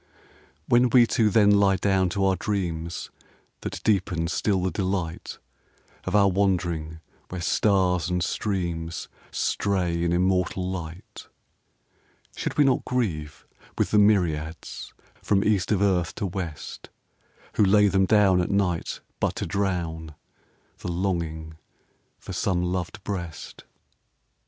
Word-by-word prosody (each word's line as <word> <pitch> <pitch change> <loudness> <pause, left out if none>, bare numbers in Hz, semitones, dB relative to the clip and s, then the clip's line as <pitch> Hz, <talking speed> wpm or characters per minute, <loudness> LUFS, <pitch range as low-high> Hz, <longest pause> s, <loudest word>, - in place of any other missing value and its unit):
When 120 +1 +4
we 120 0 +6
two 110 -1 +2
then 105 0 +5
lie 100 -1 +4
down 95 -1 +1
to 95 +2 0
our 95 -1 +3
dreams 85 -5 -3 0.5
That - - -6
deepen 90 -5 +1
still 95 +1 0
the 95 - 0
delight 90 -2 -3 0.7
Of - - -1
our 100 -1 +6
wandering 85 -5 0 0.3
where 90 - -5
stars 90 0 +2
and 90 -1 0
streams 85 -4 -3 0.2
Stray 90 -4 0
in 85 - +1
immortal 90 +1 +1
light, 85 -1 -7 1.1
Should - - -4
we 150 - +6
not 135 -3 +2
grieve 80 -13 -3 0.3
with - - 0
the 105 - +5
myriads 85 -7 0 0.3
From 100 -1 +2
East 105 -2 +1
of 100 -2 +2
earth 90 -4 +1
to - - -3
West 90 -5 -6 0.7
Who - - +5
lay 105 +1 +5
them 95 0 +2
down 100 -4 +4
at 90 - -2
night 95 -4 -1 0.2
but - - 0
to - - -3
drown 85 -5 -2 0.6
The 90 - -4
longing 85 -3 -3 0.6
for 95 - -9
some 90 0 0
loved 90 +4 -3
breast? 85 -7 -6
95 Hz, 130 wpm, -25 LUFS, 85-100 Hz, 1.1 s, we